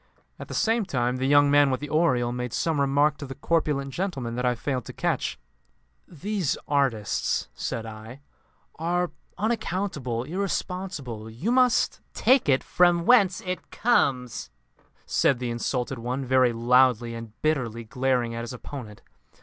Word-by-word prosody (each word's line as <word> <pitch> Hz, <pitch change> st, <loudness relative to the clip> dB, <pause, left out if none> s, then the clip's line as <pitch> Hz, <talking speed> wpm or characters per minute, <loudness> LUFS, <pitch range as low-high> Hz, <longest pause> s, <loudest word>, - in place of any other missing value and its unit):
At -, -, -7 dB
the -, -, -6 dB
same 225 Hz, 0 st, +2 dB
time 125 Hz, -8 st, -1 dB
the 130 Hz, +1 st, -1 dB
young 145 Hz, 0 st, +5 dB
man 145 Hz, -1 st, +5 dB
with 130 Hz, -, 0 dB
the 150 Hz, 0 st, -7 dB
aureole 130 Hz, -7 st, +2 dB
made 125 Hz, -1 st, -4 dB
some 160 Hz, -4 st, 0 dB
remark 145 Hz, +2 st, +2 dB
to 140 Hz, -, -7 dB
the 135 Hz, -, -7 dB
corpulent 145 Hz, -4 st, 0 dB
gentleman 140 Hz, -11 st, -3 dB
that 125 Hz, +1 st, -1 dB
I 125 Hz, -, +2 dB
failed 130 Hz, 0 st, -3 dB
to -, -, -8 dB
catch. -, -, -1 dB, 0.7 s
"These 185 Hz, -1 st, -2 dB
artists," 130 Hz, -8 st, 0 dB
said 115 Hz, -1 st, -4 dB
I, 110 Hz, +4 st, -10 dB, 0.6 s
"are 175 Hz, +2 st, 0 dB, 0.3 s
unaccountable, 185 Hz, -, -2 dB
irresponsible. 175 Hz, -, -4 dB
You 120 Hz, -, -2 dB
must 250 Hz, -1 st, +3 dB
" -, -, -42 dB
"Take 255 Hz, -, +3 dB
it 135 Hz, -1 st, +3 dB
from 175 Hz, -1 st, +3 dB
whence 200 Hz, -7 st, +5 dB
it 185 Hz, 0 st, -5 dB
comes," 130 Hz, -, +1 dB, 0.6 s
said 135 Hz, -, +2 dB
the 120 Hz, -1 st, -3 dB
insulted 125 Hz, +2 st, -2 dB
one, 125 Hz, +3 st, -3 dB
very 130 Hz, -1 st, +4 dB
loudly, 120 Hz, 0 st, +3 dB
and 115 Hz, -1 st, -9 dB
bitterly 125 Hz, -7 st, 0 dB
glaring 125 Hz, 0 st, 0 dB
at 115 Hz, -, -4 dB
his 120 Hz, +1 st, -6 dB
opponent. 125 Hz, -4 st, -9 dB
135 Hz, 155 wpm, -26 LUFS, 120-170 Hz, 0.7 s, young